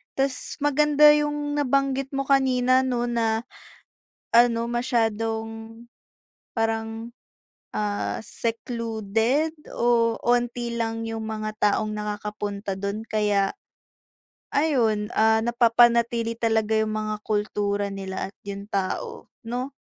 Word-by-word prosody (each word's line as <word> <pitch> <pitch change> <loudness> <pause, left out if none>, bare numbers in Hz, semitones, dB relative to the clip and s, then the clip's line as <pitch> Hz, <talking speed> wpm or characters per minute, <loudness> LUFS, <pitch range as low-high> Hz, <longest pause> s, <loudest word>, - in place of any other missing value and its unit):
ta's 270 -1 -2
maganda 295 +1 +5
yung 295 0 -1
nabanggit 275 -1 +1
mo 275 -1 -2
kanina 260 -1 +3
'no 245 -2 -1
na, 230 -1 0 0.8
ano 235 0 +5
masyadong 225 -1 -2 0.7
parang, 225 0 -2 0.6
ah, 205 -1 -2
secluded 230 +6 -1 0.2
oh, 230 -1 +2
onti 240 -1 0
lang 225 0 -2
yung 225 -1 -4
mga 215 0 -4
taong 215 +1 +1
nakakapunta 210 -1 -4
do'n 200 +2 -3
kaya, 205 -2 +1 1.0
ayun, 235 -8 +1
ah, 220 0 +4
napapanatili 235 -1 +3
talaga 220 -1 +1
yung 215 0 -1
mga 215 0 -3
kultura 205 -1 -1
nila 195 -1 -5
at - - -56
yung 200 0 -5
tao, 195 -2 -3 0.2
'no? 250 +4 -3
225 Hz, 105 wpm, -25 LUFS, 215-245 Hz, 1.0 s, maganda